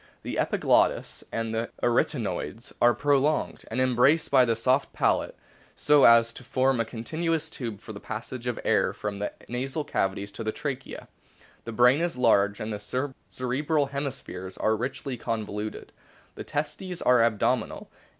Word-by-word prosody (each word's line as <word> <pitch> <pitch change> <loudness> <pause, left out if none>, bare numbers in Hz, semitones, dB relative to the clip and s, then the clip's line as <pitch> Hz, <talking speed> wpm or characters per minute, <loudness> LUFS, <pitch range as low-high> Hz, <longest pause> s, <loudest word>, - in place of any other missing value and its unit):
The - - -3
epiglottis - - +1
and 115 0 -2
the 115 +1 -2
arytenoids 120 -3 -1
are 120 -1 +5
prolonged, 145 +3 +1
and 115 - -2
embraced 130 +5 +3
by 130 -2 +6
the 115 -1 +1
soft 130 +5 +1
palate, - - 0 0.4
so 150 -1 +5
as 115 0 +6
to 125 - -11
form 130 0 +1
a 115 - +1
continuous 160 +8 -2
tube 115 -8 -5
for 110 - -9
the 100 - -8
passage 120 +3 -6
of 120 - 0
the - - -10
air - - +2
from 100 -1 -5
the 105 - -2 0.2
nasal 135 +5 -3
cavities 100 -5 -2
to 115 - -6
the 110 - -1
trachea. 140 0 -5 0.6
The 115 - -5
brain 125 +6 +5
is 175 -5 -1
large, 105 -4 +3
and 110 0 -4
the 125 +7 -3 0.2
cerebral 145 +4 0
hemispheres 135 -10 -5
are 110 - +2
richly 125 +3 -4
con 115 -2 -2
voluted. 105 +1 -6 0.4
The - - -8
testes 155 +5 -4
are 125 -1 +5
abdominal. 115 -3 0
125 Hz, 160 wpm, -27 LUFS, 110-140 Hz, 0.6 s, by